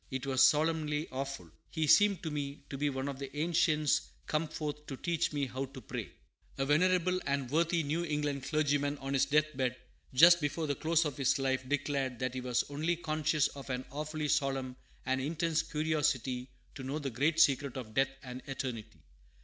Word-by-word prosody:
It 130 -1 -4
was 130 -1 +1
solemnly 150 +2 +3
awful. 130 - -5 0.2
He 160 - -1
seemed 200 +4 +5
to 160 - -3
me 145 -1 -4
to 135 - -4
be 145 0 +1
one 135 0 -3
of 140 -1 -5
the 140 +1 -7
ancients 155 -2 +2 0.2
come 155 +1 0
forth 150 -1 -5
to 135 - -5
teach 170 +2 0
me 145 -2 -1
how 130 +1 -4
to 135 0 -11
pray." 115 - -6 0.5
A 135 - 0
venerable 180 +4 +3
and 140 -3 -1
worthy 165 +2 +2
New 155 +4 -1
England 150 -4 -2
clergyman, 145 -1 +1
on 135 0 -4
his 135 - +3
death 155 0 +2
bed, 130 -2 0 0.4
just 170 +6 +7
before 150 +2 -1
the 145 - 0
close 165 +3 +1
of 150 - -3
his 135 0 +2
life, 130 -1 -1
declared 140 -3 -1
that 130 +1 -2
he 130 - -4
was 125 -1 +1
only 155 +4 0
conscious 155 -2 +1
of 140 -1 -10
an 130 0 -3
awfully 150 +1 -3
solemn 135 -4 0 0.3
and 130 0 0
intense 160 +3 0
curiosity 150 -6 -1 0.2
to - - -8
know 135 +3 -3
the 140 -3 -3
great 150 +7 +1
secret 140 -3 +3
of 115 -4 -7
death 135 +2 +3
and 125 0 -7
eternity. 115 - -5
145 Hz, 190 wpm, -32 LUFS, 130-155 Hz, 0.5 s, just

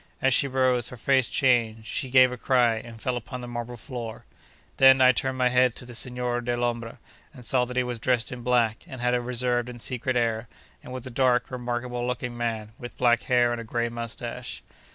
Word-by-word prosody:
As 135 -1 +2
she 140 - +3
rose, 130 -2 +1
her 125 - -10
face 130 +1 +2
changed, 115 -4 +1
she 130 +3 -3
gave 130 0 +6
a - - -4
cry, 120 -2 +2
and 115 0 -9
fell 125 +2 -2
upon 125 +1 -6
the 120 - -7
marble 120 0 -5
floor. 120 -3 -7 0.5
Then, 130 0 +7
I 130 0 +7
turned 130 +1 -1
my 125 -1 +3
head 125 -1 +3
to - - -6
the 120 - -10
Signor 125 0 -2
Dellombra, 120 -1 -2 0.4
and 125 -3 -11
saw 125 +1 +2
that 125 +1 -7
he 125 - +3
was 125 -2 -4
dressed 120 0 0
in 125 -1 -6
black, 120 -2 +1
and 130 - -9
had 125 0 +1
a 125 - +1
reserved 120 0 0
and 120 -1 -9
secret 125 +1 -2
air, 115 -1 0 0.4
and - - -10
was 130 0 -5
a 130 - -7
dark, 125 0 +2
remarkable 120 0 -3
looking 125 -1 -3
man, 115 -3 -3
with 120 -1 -9
black 120 -2 +3
hair 120 -1 +3
and 120 -1 -3
a - - -7
grey 120 +1 -2
moustache. 120 +1 -6
125 Hz, 215 wpm, -26 LUFS, 120-125 Hz, 0.5 s, Then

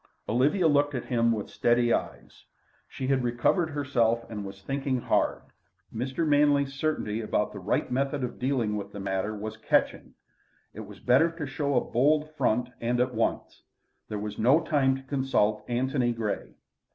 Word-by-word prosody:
Olivia 145 - +2
looked 145 -1 +2
at 125 - -3
him 115 -1 +2
with 110 -3 -2
steady 120 0 +2
eyes. - - -5 0.4
She 130 - -6
had 130 -1 +1
recovered 120 +8 +1
herself 120 -6 0
and 105 -2 -5
was 95 0 -9
thinking 135 +1 -1
hard. - - 0 0.5
Mr. 130 +7 -2
Manley's 145 -1 +3
certainty 135 -7 -2
about 105 -1 -1
the 100 - -7
right 100 +6 -1
method 135 +2 -1
of 125 -1 -5
dealing 125 -5 0
with 100 -1 -5
the 100 - -6
matter 95 +2 -2
was 110 +1 -6
catching. 110 - 0 0.6
It - - -10
was - - -12
better 135 +7 +4
to 165 -3 -5
show 140 +1 -2
a 125 - +4
bold 150 +5 +2
front 125 -4 0
and 120 +1 0
at 125 0 +1
once. 115 0 -2 0.5
There 105 - -3
was 105 0 -5
no 130 +9 +5
time 140 -5 +2
to 135 - -8
consult 130 -6 0
Antony 125 0 0
Grey. 110 -3 -4
125 Hz, 170 wpm, -27 LUFS, 110-140 Hz, 0.6 s, no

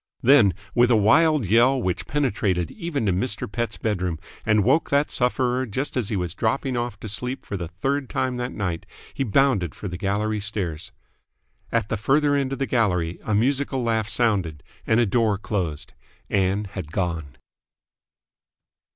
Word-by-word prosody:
Then, 115 - +6 0.2
with 120 0 +4
a 120 - +5
wild 145 +6 +4
yell 120 +7 +4
which 95 -7 -2
penetrated 105 - 0
even 165 - -3
to 95 - +2
Mr. 100 +3 -1
Pett's 115 +1 -3
bedroom 90 -6 -1 0.3
and 105 -1 +4
woke 135 +9 +2
that 140 +1 +2
sufferer 125 0 0
just 130 +7 -3
as 120 -6 0
he 110 - -1
was 90 -4 -2
dropping 130 +3 -1
off 120 -4 -3
to - - -6
sleep 125 +5 -2
for 100 - -5
the 90 -3 -4
third 135 - -2
time 130 -1 -1
that 125 +1 -3
night 90 -5 -3 0.3
he 135 - -1
bounded 115 - +2
for 105 - -6
the 90 -1 -6
gallery 105 +2 -1
stairs. 95 -6 -3 0.8
At 105 - 0
the 110 - -1
further 145 +6 +2
end 135 -2 0
of 135 - -2
the 135 - -1
gallery 90 -10 0
a 110 - 0
musical 135 +3 +1
laugh 110 -2 0
sounded, 95 -11 +1 0.2
and 110 +1 +3
a 120 - +4
door 110 -1 +2
closed. 90 -7 -3 0.4
Ann 100 +1 +1
had 90 -6 -6
gone. 85 -7 -3
110 Hz, 170 wpm, -24 LUFS, 95-130 Hz, 0.8 s, Then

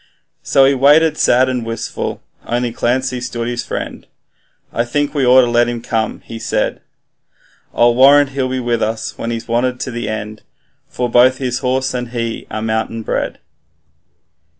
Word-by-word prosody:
So 135 - +4
he 135 - +4
waited 150 +4 +4
sad 130 +2 +4
and 125 -2 -2
wistful 115 - -5 0.2
only 120 0 -1
Clancy 125 +1 -1
stood 120 -1 -4
his 120 0 -3
friend - - -6 0.7
'I 115 - 0
think 145 +4 -1
we 140 -4 +1
ought 130 +1 +7
to 125 - +1
let 120 0 +2
him 120 -1 -3
come,' 115 -1 -2
he 115 - -9
said; - - -1 0.9
'I 120 - +4
warrant 135 +3 +5
he'll 130 -1 -2
be 130 0 -2
with 120 -2 -1
us 110 +1 -2
when 115 - -3
he's 115 -1 -4
wanted 120 +2 0
at 130 - -5
the 120 -2 -4
end, 110 0 -5 0.5
For 125 - -2
both 125 +2 +4
his 125 -2 -2
horse 130 0 -1
and 125 -1 -3
he 115 -1 -4
are 110 0 -4
mountain 110 0 -2
bred. - - -2
120 Hz, 175 wpm, -17 LUFS, 115-130 Hz, 0.9 s, ought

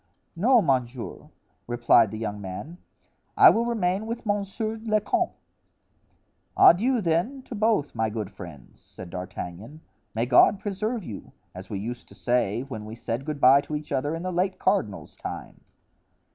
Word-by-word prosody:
"No, 230 +6 +4
monsieur," 125 -2 -2 0.4
replied 120 -2 +4
the 110 - -6
young 105 -2 -4
man; 100 - -7 0.6
"I 400 -3 +9
will 230 +1 +1
remain 205 -2 0
with 230 +1 -5
monsieur 210 +2 -2
le 215 -1 +2
comte." 360 - 0 1.2
"Adieu, 235 +7 +6
then, 180 +11 0
to - - -9
both, 215 -9 +1
my 110 -1 0
good 105 -2 -5
friends," 85 -10 -12
said 90 -2 -11
D'Artagnan; 90 - -7 0.3
"may 115 +2 +1
God 130 +10 +5
preserve 215 +3 -3
you! 105 - -9 0.2
as 90 +2 -10
we 105 - -3
used 120 +5 -6
to - - -16
say 120 -2 0
when 110 -6 -7
we 110 +1 -8
said 120 +2 -4
good 150 -2 -4
bye 135 +1 +7
to 150 - -5
each 150 0 -6
other 145 +4 -1
in 165 - -6
the 185 - -2
late 185 +2 0
cardinal's 185 - -1
time." - - -8
145 Hz, 160 wpm, -26 LUFS, -, 1.2 s, I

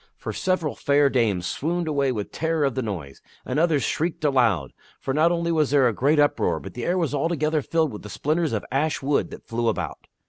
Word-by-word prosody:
For - - -5
several 185 -5 0
fair 140 -1 +2
dames 105 -8 +1
swooned 165 - -2
away 140 -3 +1
with 105 -4 -4
terror 160 -1 0
of 135 - 0
the 130 - -2
noise, 85 - -6 0.2
and - - -1
others 160 -5 +2
shrieked 165 +1 -2
aloud; 115 - +2 0.3
for 135 - -2
not 160 +4 +4
only 170 -1 0
was 155 -3 +2
there 140 -1 +4
that 120 - +3
great 140 +8 +2
uproar, 145 0 +2
but - - -9
the 120 - -5
air 180 +2 +1
was 165 -6 0
altogether 155 0 0
filled 160 -1 0
with 105 - -7
the 105 - -9
splinters 155 - 0
of 110 -2 -2
ash 145 +2 0
wood 140 +1 +1
that - - -11
flew 115 0 -1
about. 110 - -3
145 Hz, 220 wpm, -24 LUFS, 120-160 Hz, 0.3 s, not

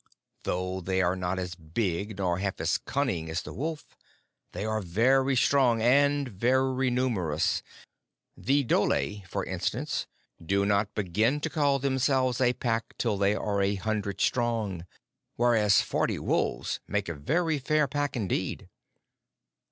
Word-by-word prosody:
Though 90 +1 -2
they 95 +1 0
are 90 +1 +1
not 90 0 -2
as 90 -1 -3
big 90 +4 -3
nor 90 -2 0
half 100 -1 -2
as - - +1
cunning 120 - -2
as 80 +1 -2
the - - -8
wolf, 155 +3 -4 0.7
they 105 - -4
are 110 0 -1
very 130 +9 +2
strong 125 -2 +3
and 140 +4 +3
very 130 +4 +1
numerous. 100 -12 0 0.7
The 140 +1 +1
dhole, 80 - +1
for - - -3
instance, - - -2 0.4
do 100 +4 +1
not 100 0 +1
begin 110 +8 +1
to 160 - -2
call 145 -3 +2
themselves 130 -2 +1
a 125 -1 +4
pack 115 -2 -2
till 115 -4 0
they 100 +1 +3
are 100 -2 -1
a 100 +1 +1
hundred 100 0 -2
strong; 110 -8 0 0.5
whereas 110 -5 +4
forty - - -1
wolves - - -1
make - - -1
a 85 - -3
very 155 - 0
fair 150 +2 +2
pack 145 +1 -2
indeed. 105 -6 -2
110 Hz, 145 wpm, -28 LUFS, 95-130 Hz, 0.7 s, a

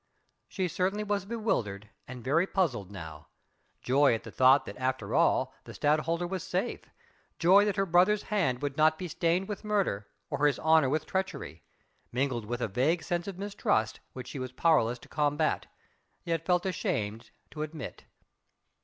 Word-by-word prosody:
She 185 -2 -2
certainly 185 +5 -1
was 205 -2 -1
bewildered 115 - -2 0.2
and 125 -2 -8
very 160 +8 +2
puzzled 130 - 0
now: 80 -6 -9 0.6
joy 135 -1 +4
at 110 - -6
the - - -9
thought 130 +2 +5
that 100 - -7
after 130 0 -2
all - - +3
the - - -10
Stadtholder 155 +4 +1
was 185 0 -3
safe, - - -2 0.5
joy 195 +4 +6
that 205 - 0
her 195 -1 +1
brother's 185 +4 +4
hand 155 - 0
would 145 -1 -2
not 155 0 +4
be 180 - -5
stained 170 +3 0
with 210 0 -5
murder, 200 - 0 0.2
or 145 0 +3
his 145 - +1
honour 160 -4 +4
with 155 +2 0
treachery, 160 - -3 0.5
mingled 125 -3 -1
with 120 +3 -4
a - - +1
vague 145 - +1
sense 175 +1 -2
of 195 -3 -5
mistrust 195 - 0
which 130 -1 -7
she 140 - -6
was 130 -1 -4
powerless 130 -5 +2
to - - -16
combat, 150 +1 0 0.6
yet 165 -1 -2
felt 180 0 +2
ashamed 110 - -2 0.2
to 150 - -6
admit. 155 -3 -6
155 Hz, 170 wpm, -29 LUFS, 125-185 Hz, 0.6 s, joy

